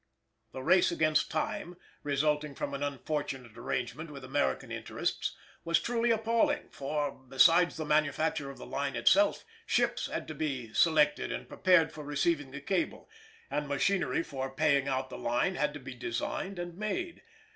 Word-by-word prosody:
_ -, -, -44 dB
The 130 Hz, -, -7 dB
race 185 Hz, +6 st, +5 dB
against 155 Hz, -2 st, +2 dB
time 175 Hz, +2 st, -3 dB, 0.2 s
resulting 150 Hz, 0 st, 0 dB
from -, -, -4 dB
an 140 Hz, -, -4 dB
unfortunate 140 Hz, -4 st, -3 dB
arrangement 125 Hz, +5 st, -3 dB
with 140 Hz, -2 st, -9 dB
American 65 Hz, -, -1 dB
interests -, -, -2 dB, 0.3 s
was 170 Hz, 0 st, +3 dB
truly 235 Hz, 0 st, 0 dB
appalling; 230 Hz, 0 st, +2 dB
for, 145 Hz, +1 st, -2 dB
besides 165 Hz, +8 st, +4 dB
the 160 Hz, -, -3 dB
manufacture 150 Hz, -1 st, +1 dB
of 140 Hz, -, -9 dB
the -, -, -9 dB
line 140 Hz, 0 st, -2 dB
itself, 305 Hz, +1 st, +4 dB, 0.2 s
ships -, -, +1 dB
had -, -, -4 dB
to -, -, -4 dB
be 130 Hz, -8 st, -3 dB
selected 150 Hz, -3 st, +3 dB
and -, -, -5 dB
prepared 170 Hz, -4 st, +4 dB
for 155 Hz, -, -8 dB
receiving 145 Hz, 0 st, 0 dB
the 140 Hz, +1 st, -8 dB
cable, 190 Hz, -, -2 dB, 0.4 s
and 150 Hz, 0 st, -1 dB
machinery 145 Hz, +1 st, +1 dB
for 135 Hz, -3 st, -4 dB
paying 140 Hz, 0 st, +2 dB
out 130 Hz, -1 st, -1 dB
the -, -, -6 dB
line 120 Hz, +10 st, +1 dB
had 150 Hz, -4 st, 0 dB
to -, -, -6 dB
be 130 Hz, 0 st, -8 dB
designed 125 Hz, +10 st, -3 dB
and 175 Hz, -1 st, -5 dB
made. 340 Hz, +12 st, -3 dB
150 Hz, 165 wpm, -31 LUFS, 135-170 Hz, 0.4 s, race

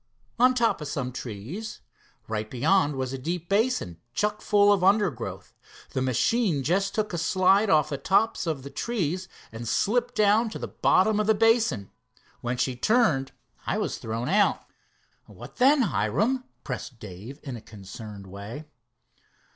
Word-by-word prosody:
"On 255 Hz, +1 st, +5 dB
top 230 Hz, -8 st, +1 dB
of 150 Hz, -, -4 dB
some 130 Hz, -3 st, -3 dB
trees. 125 Hz, -, -7 dB, 0.5 s
Right 110 Hz, -1 st, -3 dB
beyond 145 Hz, -, +2 dB
was 130 Hz, -1 st, -3 dB
a 135 Hz, -, -4 dB
deep 170 Hz, +5 st, -4 dB
basin, 200 Hz, -, 0 dB, 0.2 s
chuck 210 Hz, 0 st, 0 dB
full 205 Hz, 0 st, +4 dB
of 190 Hz, -3 st, 0 dB
undergrowth. 195 Hz, -, +1 dB, 0.4 s
The 130 Hz, -, -2 dB
machine 145 Hz, -, +1 dB
just 195 Hz, -, 0 dB
took 215 Hz, -3 st, -1 dB
a 175 Hz, -, -1 dB
slide 190 Hz, +4 st, +3 dB
off 155 Hz, -4 st, +4 dB
the 140 Hz, -2 st, -3 dB
tops 195 Hz, +5 st, +1 dB
of 150 Hz, -5 st, -2 dB
the 140 Hz, -, -8 dB
trees, 185 Hz, -5 st, -2 dB, 0.2 s
and 115 Hz, +1 st, -7 dB
slipped 245 Hz, -, +1 dB
down 215 Hz, +1 st, +3 dB
to -, -, -6 dB
the -, -, -5 dB
bottom 210 Hz, +3 st, +2 dB
of 210 Hz, -, 0 dB
the 220 Hz, -, +4 dB
basin. 220 Hz, -, +2 dB, 0.5 s
Then 120 Hz, +1 st, -2 dB
she 125 Hz, 0 st, 0 dB
turned, 155 Hz, -, +2 dB, 0.4 s
I -, -, 0 dB
was -, -, -2 dB
thrown 115 Hz, +2 st, -4 dB
out." 205 Hz, +4 st, +3 dB, 0.7 s
"What -, -, -12 dB
then, 270 Hz, +2 st, +5 dB
Hiram?" 250 Hz, +3 st, 0 dB, 0.2 s
pressed 125 Hz, -, -6 dB
Dave 105 Hz, +7 st, -9 dB
in 135 Hz, -4 st, -5 dB
a 115 Hz, -, -8 dB
concerned 105 Hz, -1 st, -10 dB
way. 100 Hz, +10 st, -8 dB
175 Hz, 160 wpm, -26 LUFS, -, 0.7 s, On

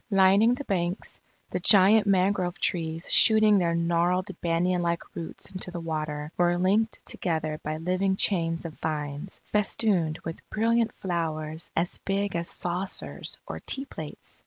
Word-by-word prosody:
Lining 200 Hz, +4 st, +5 dB
the 285 Hz, -, -6 dB
banks, 180 Hz, -4 st, -3 dB, 0.3 s
the -, -, -1 dB
giant 205 Hz, +1 st, +6 dB
mangrove 185 Hz, -2 st, +1 dB
trees 165 Hz, -1 st, -2 dB
shooting 215 Hz, -2 st, +6 dB
their 170 Hz, -2 st, +1 dB
gnarled 175 Hz, +2 st, +1 dB
banyan 175 Hz, +1 st, +1 dB
like 170 Hz, 0 st, -1 dB
roots 165 Hz, -, -7 dB
into 185 Hz, -1 st, -5 dB
the 175 Hz, -1 st, -6 dB
water, 155 Hz, -2 st, -4 dB
were 175 Hz, 0 st, +2 dB
linked 205 Hz, +5 st, +1 dB
together 155 Hz, -3 st, -2 dB
by 155 Hz, +1 st, -3 dB
living 185 Hz, +4 st, 0 dB
chains 165 Hz, -4 st, +2 dB
of 165 Hz, -, -6 dB
vines, 150 Hz, +2 st, -4 dB
festooned 195 Hz, -6 st, +1 dB
with 165 Hz, 0 st, -6 dB
brilliant 230 Hz, +1 st, +1 dB
flowers 160 Hz, -3 st, -4 dB
as 170 Hz, +2 st, -1 dB
big 195 Hz, -1 st, -2 dB
as 170 Hz, 0 st, -2 dB
saucers 180 Hz, +2 st, -4 dB
or -, -, -6 dB
teaplates. 265 Hz, -, -7 dB
175 Hz, 140 wpm, -26 LUFS, 165-195 Hz, 0.3 s, giant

